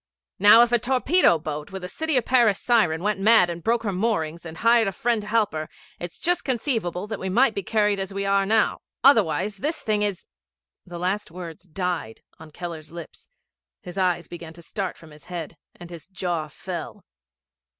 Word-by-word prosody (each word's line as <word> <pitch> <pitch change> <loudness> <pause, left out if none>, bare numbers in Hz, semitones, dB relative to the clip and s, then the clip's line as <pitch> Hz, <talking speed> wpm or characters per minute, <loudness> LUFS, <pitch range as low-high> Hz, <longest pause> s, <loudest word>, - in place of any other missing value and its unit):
'Now 210 +4 +8
if 240 - 0
a 240 - +4
torpedo 260 - +3
boat 150 +2 -6
with 190 -1 -7
a - - -4
City 315 - -1
of 245 - +1
Paris 235 -6 +3
siren 185 -9 +2
went 210 -1 0
mad 205 -3 +5
and 170 -1 -7
broke 230 0 +1
her 205 - -1
moorings 170 -5 -2
and 160 0 -9
hired 230 +1 +4
a - - 0
friend 230 +3 0
to 210 - -10
help 220 -1 +2
her, 155 0 -4 0.3
it's 175 -1 -7
just 355 0 0
conceivable 225 - -2
that 215 -1 -5
we 190 - -3
might 235 +4 +3
be 200 - -3
carried 210 0 +1
as 195 0 -4
we 200 0 -3
are 195 0 +3
now. 215 +3 +2 0.2
Otherwise 205 - +3
this 305 - -3
thing 215 -2 +1
is 200 -3 -1 0.3
' - - -68
The 175 -1 -7
last 185 +4 -2
words 170 0 -9
died 175 - -3 0.2
on 160 0 -12
Keller's 165 -1 -8
lips, 170 -1 -11 0.5
his 180 - -9
eyes 180 -2 0
began 170 -2 -9
to 170 0 -14
start 195 +1 -4
from 160 -2 -15
his 150 0 -15
head, 170 -3 -6 0.2
and 175 0 -12
his 170 -2 -10
jaw 175 -4 -3
fell. 150 - -7
195 Hz, 200 wpm, -24 LUFS, 170-225 Hz, 0.5 s, Now